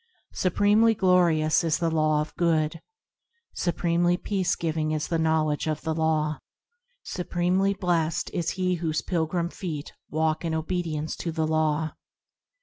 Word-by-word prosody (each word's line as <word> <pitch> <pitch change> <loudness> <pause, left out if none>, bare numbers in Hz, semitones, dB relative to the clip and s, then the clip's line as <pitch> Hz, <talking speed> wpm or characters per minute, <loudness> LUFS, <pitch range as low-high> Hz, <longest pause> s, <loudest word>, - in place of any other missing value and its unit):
Supremely 205 +5 +3
glorious 175 -5 +3
is 165 -2 +1
the 165 -1 0
Law 155 -1 +2
of 150 - -6
Good, 165 -2 +1 0.7
Supremely 175 0 +1
peace 190 -1 -1
giving 160 -2 -1
is 155 0 -2
the 165 - 0
knowledge 160 -2 +1
of 155 -1 -2
the 160 -1 -1
Law, 155 -1 0 0.6
Supremely 180 +2 0
blessed 175 -3 0
is 175 -3 -1
he 185 -1 +1
whose 160 -2 -1
pilgrim 170 0 -1
feet 155 -6 -6 0.2
walk 155 +1 0
in 165 -1 -1
obedience 160 -2 -2
to 170 - -3
the 160 -1 -1
Law. 155 0 +1
165 Hz, 140 wpm, -26 LUFS, 155-175 Hz, 0.7 s, Supremely